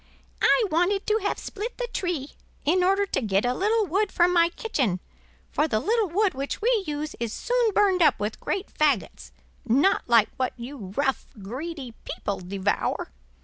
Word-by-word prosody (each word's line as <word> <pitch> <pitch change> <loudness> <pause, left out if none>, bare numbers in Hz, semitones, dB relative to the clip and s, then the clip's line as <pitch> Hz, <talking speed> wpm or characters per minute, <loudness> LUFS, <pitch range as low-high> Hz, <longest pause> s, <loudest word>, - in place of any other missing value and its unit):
"I 485 - +5
wanted 360 +5 +1
to 435 +1 +2
have 405 - -1
split 440 +4 -6
the - - -2
tree, 335 -7 -2 0.4
in 360 +5 +3
order 390 +2 +3
to 390 - -1
get 205 -1 +1
a 245 - +2
little 430 - +1
wood 390 +3 0
for 345 - +4
my 340 -1 +4
kitchen, 270 - -1 0.5
for 305 - +1
the 215 -7 +1
little 435 - +1
wood 395 +3 +2
which 275 +1 -4
we 460 -2 +2
use 300 0 -3
is 235 -2 -2
soon 480 - +1
burned 390 -3 +3
up 320 - +4
with 210 +1 -3
great 390 0 -3
fagots, 195 - 0 0.3
not 275 +6 +2
like 230 -3 +5
what 255 -1 -1
you 235 -5 -8
rough, 275 -2 0 0.2
greedy 265 - -6
people 200 - -4
devour! 190 +2 -2
320 Hz, 175 wpm, -25 LUFS, 240-400 Hz, 0.5 s, I